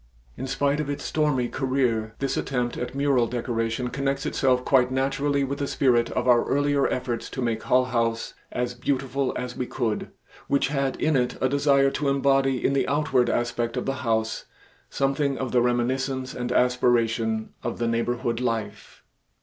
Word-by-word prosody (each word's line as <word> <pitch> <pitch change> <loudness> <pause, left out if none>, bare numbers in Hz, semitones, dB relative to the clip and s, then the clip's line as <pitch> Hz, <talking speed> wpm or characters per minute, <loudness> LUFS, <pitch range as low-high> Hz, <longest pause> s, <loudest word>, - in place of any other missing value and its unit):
In 130 - -5
spite 140 +2 0
of 150 -2 -2
its 145 - -3
stormy 150 -5 +1
career 125 -5 -1
this 135 -1 -1
attempt 125 -2 -1
at 125 +1 -5
mural 140 -4 +2
decoration 115 0 -2
connects 140 +1 -2
itself 125 -1 +1
quite 130 -2 +4
naturally 140 +2 0
with 140 +1 -3
the 140 - -1
spirit 120 -4 +2
of - - -1
our 120 -1 +5
earlier 145 0 +2
efforts 120 -2 -3
to - - -7
make 115 -3 -1
Hull 130 0 +3
House 115 -2 -1 0.2
as 125 0 -2
beautiful 135 +1 -1
as 125 0 -4
we 125 - -3
could, 115 -4 -2 0.4
which 140 0 +1
had 135 -2 0
in 155 -1 +2
it 125 -2 0
a 130 - +2
desire 140 0 +3
to 145 0 -1
embody 135 -1 +2
in 135 - +3
the 140 - +1
outward 135 -4 +2
aspect 120 -1 -1
of - - -2
the 135 0 -2
House 110 -2 -1 0.4
something 140 0 0
of 130 -2 -3
the 125 - +3
reminiscence 130 +2 0
and 125 0 -4
aspiration 115 -3 +1
of 120 - -4
the 120 - -1
neighborhood 115 +1 -1
life. 115 -4 -4
130 Hz, 175 wpm, -25 LUFS, 120-135 Hz, 0.4 s, our